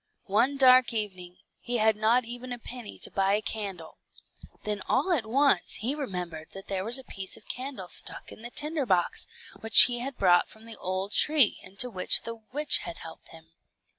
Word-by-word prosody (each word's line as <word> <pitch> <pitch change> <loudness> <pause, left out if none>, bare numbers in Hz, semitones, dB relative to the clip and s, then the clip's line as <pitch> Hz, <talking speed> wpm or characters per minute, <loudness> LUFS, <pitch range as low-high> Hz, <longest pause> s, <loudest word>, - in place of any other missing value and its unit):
One 235 +8 +1
dark 255 -2 +6
evening, 185 -4 -5 0.2
he 245 0 -2
had 220 -1 +3
not 225 +3 +2
even 245 +2 -7
a 245 - -4
penny 240 -2 -9
to - - -3
buy 195 0 +1
a 210 - 0
candle; 205 -4 -6 0.6
then 210 -1 -3
all 290 +9 +1
at 240 -10 -1
once 270 -4 +2
he 240 +6 -2
remembered 180 - -6
that 195 0 -10
there 190 -1 -2
was 230 +5 0
a 265 - -7
piece 195 -5 -6
of - - -19
candle 255 -7 -6
stuck - - -2
in - - -12
the 240 - -6
tinder 300 +1 -1
box, 180 -3 0 0.3
which 225 0 +8
he 240 -1 +1
had 265 +1 -5
brought 175 -2 +4
from 220 +1 -14
the 230 -1 -5
old 185 +2 -4
tree, 295 -5 +4
into 195 +6 -2
which 185 -6 +1
the 230 - -5 0.2
witch 295 +3 +3
had 170 - -8
helped 165 - -12
him. 160 0 -16
220 Hz, 195 wpm, -27 LUFS, 190-255 Hz, 0.6 s, which